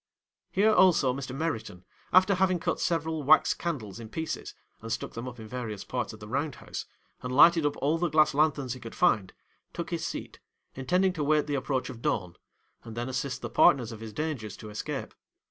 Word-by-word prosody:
'Here 215 +3 +3
also 170 -10 +5
Mr. 135 -1 -5
Meriton, 110 - -4 0.3
after 185 +2 +6
having 185 -1 +2
cut 170 - -2
several 160 -2 -1
wax 150 +3 +5
candles 120 - -4
in 110 -2 -9
pieces, 160 +7 -5 0.3
and 115 +1 -7
stuck 115 - -3
them 115 +2 -6
up 125 -1 -8
in 110 - -8
various 110 -4 -5
parts 125 -1 -3
of 110 - -12
the 105 - -9
round 140 +4 -2
house, - - -7 0.3
and 125 - -4
lighted 160 +3 +6
up 145 - -3
all 155 +4 +1
the 175 0 +1
glass 155 -1 +4
lanthorns 140 -4 +1
he 130 - -9
could 115 -2 -9
find, 105 - +2 0.4
took - - -5
his - - -2
seat, - - -5 0.3
intending 180 +8 +1
to 155 -4 -2
wait 150 +1 +3
the 145 - -3
approach 135 -1 -1
of 115 - -11
dawn; 90 -7 -1 0.5
and 115 -1 -9
then 120 +2 -2
assist 130 0 -3
the - - -3
partners 120 -5 +4
of 110 - -8
his 110 -1 -7
dangers 135 -8 -4
to 105 - -9
escape. 105 - -5
135 Hz, 205 wpm, -28 LUFS, 115-160 Hz, 0.5 s, after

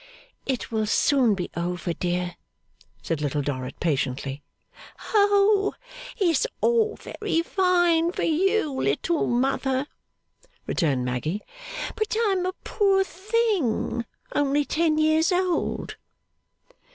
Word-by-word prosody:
'It 260 -3 -2
will 220 -1 0
soon 245 -1 +3
be 180 -2 -4
over, 175 0 -2
dear,' 180 +1 -2 0.7
said 165 -3 -2
Little 145 0 -1
Dorrit 130 -2 -4
patiently. 140 -2 -1 0.7
'Oh 405 -1 +4 0.4
it's 360 - +2
all 450 -2 +2
very 390 -6 -2
fine 350 -3 +2
for - - -3
you, 370 +1 +2
little 265 - 0
mother,' 265 +2 0 0.8
returned 135 -7 0
Maggy, 150 +11 -2 0.5
'but 435 0 -1
I'm 380 -3 +1
a 370 - -2
poor 390 -2 +2
thing, 380 - 0 0.3
only 290 0 +2
ten 315 0 +1
years 315 +3 +3
old. 360 -1 -1
305 Hz, 105 wpm, -25 LUFS, -, 0.8 s, Oh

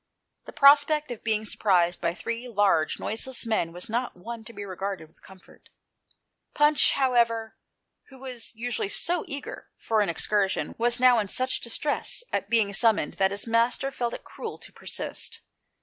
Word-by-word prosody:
The - - -9
prospect 290 +1 +5
of 235 - -7
being 220 -1 0
surprised 180 -5 +1
by 170 -1 0
these 230 +6 -5
large, 200 -7 +2
noiseless 240 +3 -1
men 215 -7 0
was 175 +4 -6
not 240 -2 -2
one 230 +5 -8
to 235 - -9
be 205 -2 -7
regarded 190 -3 -5
with 160 - -20
comfort. 190 -1 -18 0.9
Punch, 295 0 +4
however, 235 -4 +1 0.5
who 265 - -14
was 255 -3 -6
usually 235 -3 -3
so 345 +9 0
eager 285 - -7
for 220 -1 0
an 200 - +1
excursion, 195 +3 0
was 240 +1 +3
now 250 -2 +6
in 210 - -1
such 255 +6 0
distress 290 - -2
at - - -1
being 220 -4 +2
summoned 220 +1 +3
that 190 - +5
his 200 +1 -3
master 235 +4 +1
felt 240 -3 -3
it - - -10
cruel - - -8
to - - -12
persist. - - -6
230 Hz, 165 wpm, -26 LUFS, 200-255 Hz, 0.9 s, now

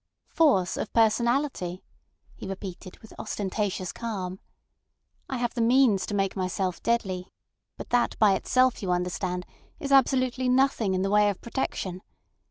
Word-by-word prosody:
"Force 225 - +2
of - - -4
personality," 230 -4 +1 0.5
he - - -8
repeated, 190 -1 -7
with 220 - -13
ostentatious 200 -3 -3
calm. 190 -5 -5 0.9
"I 265 - -2
have 240 -1 -1
the 240 - -2
means 235 -4 +4
to 205 - -3
make 195 -1 0
myself 185 -1 -2
deadly, 190 -6 -1 0.5
but - - -9
that 245 -1 +2
by 210 -3 +5
itself, 255 +6 +2
you 190 -3 -1
understand, 180 0 -2 0.3
is 280 -4 -4
absolutely 255 -1 +3
nothing 250 -6 +2
in 185 - 0
the 195 - -1
way 210 0 +5
of 200 - -4
protection. 190 -7 -4
210 Hz, 145 wpm, -27 LUFS, 185-245 Hz, 0.9 s, by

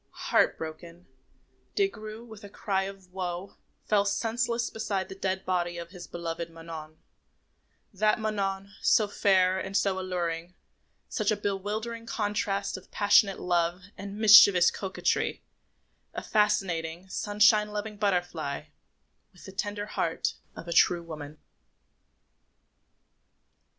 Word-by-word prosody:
Heart - - +4
broken, 165 +2 -8 0.7
Des 400 -1 +3
Grieux, 215 - -9
with 220 -2 -12
a 205 - -9
cry 195 -1 -1
of 195 -2 -10
woe, 180 0 -5 0.3
fell 205 -1 +3
senseless 235 +3 -1
beside 200 -4 -2
the - - -6
dead 190 0 -2
body 175 -2 -1
of 170 0 -7
his 180 -2 -10
beloved 170 -1 -5
Manon 165 -1 -9 1.0
that 215 +2 +2
Manon, 200 -2 -2
so 215 - +4
fair 190 -2 +3
and 195 +1 -2
so 190 -1 +1
alluring, 175 -2 -3 0.5
such 215 -2 -1
a 215 - +2
bewildering 210 +3 -3
contrast 205 -3 -1
of 185 - -14
passionate 200 -1 +4
love 175 0 +1 0.2
and 200 +1 -7
mischievous 205 -4 +8
coquetry, 190 -1 -1 0.7
a - - -4
fascinating, 180 -5 0
sunshine 210 +2 +3
loving 210 +1 -4
butterfly 175 -8 -1 0.7
with 180 - -16
the 190 - -9
tender 205 +1 -3
heart 165 -5 -1 0.2
of 170 - -9
a 170 - -2
true 175 0 +4
woman. 155 -2 -8
195 Hz, 125 wpm, -28 LUFS, 175-210 Hz, 1.0 s, mischievous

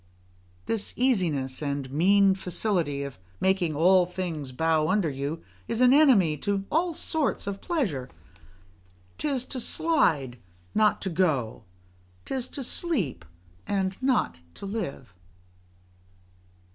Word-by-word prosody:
This 220 -2 -2
easiness 165 - +1
and 140 -2 -3
mean 195 +6 +4
facility 180 -6 -1
of 140 -8 -8 0.2
making 190 -5 +1
all 180 +3 +5
things 170 -7 -4
bow 160 +3 +1
under 190 -3 +1
you, 140 +4 -4 0.2
is 230 - -2
an 250 0 +6
enemy 230 - +5
to 195 +5 -2
all 335 +1 +1
sorts 310 -2 0
of 200 0 -4
pleasure: 195 - -2 1.1
'tis 275 -4 -1
to 260 - -5
slide, 150 - +1 0.3
not 215 0 +2
to 190 - -2
go; 145 - 0 0.6
'tis 260 -2 -3
to 275 - -6
sleep, 220 - -2 0.4
and 190 -1 0
not 255 - +1 0.2
to - - -8
live. 190 - -5
185 Hz, 120 wpm, -27 LUFS, 145-225 Hz, 1.1 s, an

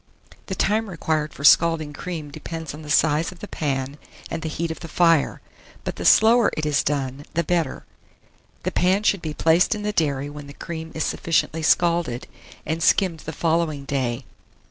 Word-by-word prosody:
The 190 - -3
time 215 +3 +1
required 155 -4 -1
for 140 - -10
scalding 160 -1 +5
cream 160 -2 -6
depends 160 +1 -6
on 150 - -9
the 150 - -10
size 155 +2 +2
of 185 - -13
the 210 - -8
pan 140 -3 -3 0.3
and 165 - -3
the 160 - -3
heat 165 +2 -3
of 160 - -6
the 165 - -8
fire; 165 -2 +2 0.4
but - - -4
the - - -5
slower 230 +1 +6
it 155 - -1
is 145 -2 +2
done, 140 -1 -2
the 170 - +2
better. 170 -4 -1 0.8
The - - -1
pan 190 +3 +2
should 200 -4 +2
be 155 -2 -5
placed 165 +8 +3
in 210 - -6
the 210 0 -1
dairy 145 -6 0
when 145 0 -9
the 140 - -10
cream 160 +1 -7
is 160 - -1
sufficiently 165 -1 0
scalded, 170 -6 +2 0.4
and 160 +1 -2
skimmed 180 -1 +3
the 160 - -6
following 160 -3 0
day. 130 -2 -2
160 Hz, 190 wpm, -23 LUFS, 145-170 Hz, 0.8 s, slower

